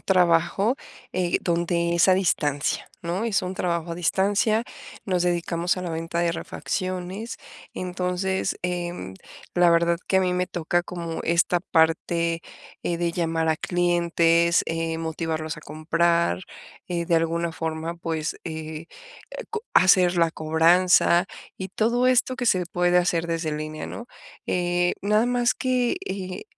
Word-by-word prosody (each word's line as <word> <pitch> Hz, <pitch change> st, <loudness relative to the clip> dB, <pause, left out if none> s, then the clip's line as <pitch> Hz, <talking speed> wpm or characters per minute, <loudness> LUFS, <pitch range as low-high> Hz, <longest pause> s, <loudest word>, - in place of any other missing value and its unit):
trabajo, 180 Hz, +5 st, +2 dB, 0.4 s
eh, 180 Hz, -1 st, +1 dB
donde 170 Hz, 0 st, 0 dB
es 170 Hz, +2 st, +4 dB
a 185 Hz, -, +7 dB
distancia, 150 Hz, -6 st, 0 dB
¿no?, 175 Hz, +6 st, -2 dB
es 220 Hz, -4 st, +1 dB
un 185 Hz, +1 st, -4 dB
trabajo 170 Hz, -2 st, -2 dB
a -, -, -3 dB
distancia, 200 Hz, +6 st, +1 dB, 0.4 s
nos 180 Hz, -3 st, 0 dB
dedicamos 175 Hz, 0 st, 0 dB
a 185 Hz, -, -4 dB
la 175 Hz, -, -4 dB
venta 165 Hz, +1 st, -3 dB
de 170 Hz, -1 st, +2 dB
refacciones, 185 Hz, +8 st, -4 dB, 0.4 s
entonces, 185 Hz, +1 st, -2 dB
em, 175 Hz, -, -3 dB, 0.4 s
la 175 Hz, -1 st, +5 dB
verdad 170 Hz, 0 st, +3 dB
que 190 Hz, -, +3 dB
a -, -, +5 dB
mí 180 Hz, -1 st, +1 dB
me 180 Hz, 0 st, -1 dB
toca 175 Hz, -1 st, 0 dB
como 170 Hz, -2 st, -5 dB
esta 170 Hz, +1 st, +2 dB
parte, 165 Hz, 0 st, +1 dB, 0.4 s
eh, 170 Hz, -, -1 dB
de 170 Hz, 0 st, -1 dB
llamar 165 Hz, -1 st, 0 dB
a 160 Hz, -, +3 dB
clientes, 170 Hz, -1 st, +2 dB
eh, 165 Hz, 0 st, -2 dB
motivarlos 160 Hz, -1 st, -3 dB
a -, -, -10 dB
comprar, 170 Hz, +3 st, +1 dB, 0.5 s
eh, 170 Hz, -1 st, -2 dB
de 170 Hz, -, +2 dB
alguna 165 Hz, 0 st, 0 dB
forma, 160 Hz, +1 st, -4 dB
pues, 165 Hz, -2 st, -3 dB
eh, 160 Hz, 0 st, -6 dB, 0.6 s
co 445 Hz, -1 st, -4 dB
hacer 185 Hz, -1 st, +5 dB
la 165 Hz, -1 st, +3 dB
cobranza, 170 Hz, +3 st, +4 dB, 0.3 s
y 190 Hz, -, -5 dB
todo 235 Hz, +6 st, +1 dB
esto 255 Hz, 0 st, +2 dB
que 250 Hz, -2 st, -2 dB
se 185 Hz, -5 st, +2 dB
puede 175 Hz, 0 st, +2 dB
hacer 170 Hz, -1 st, +1 dB
desde 165 Hz, -2 st, -1 dB
línea, 155 Hz, +1 st, -5 dB
¿no?, 235 Hz, -, -7 dB, 0.4 s
eh, 175 Hz, 0 st, +1 dB
nada 210 Hz, +3 st, +3 dB
más 245 Hz, 0 st, +2 dB
que, 255 Hz, +2 st, 0 dB
eh, 185 Hz, -1 st, -5 dB
175 Hz, 145 wpm, -24 LUFS, 165-185 Hz, 0.6 s, a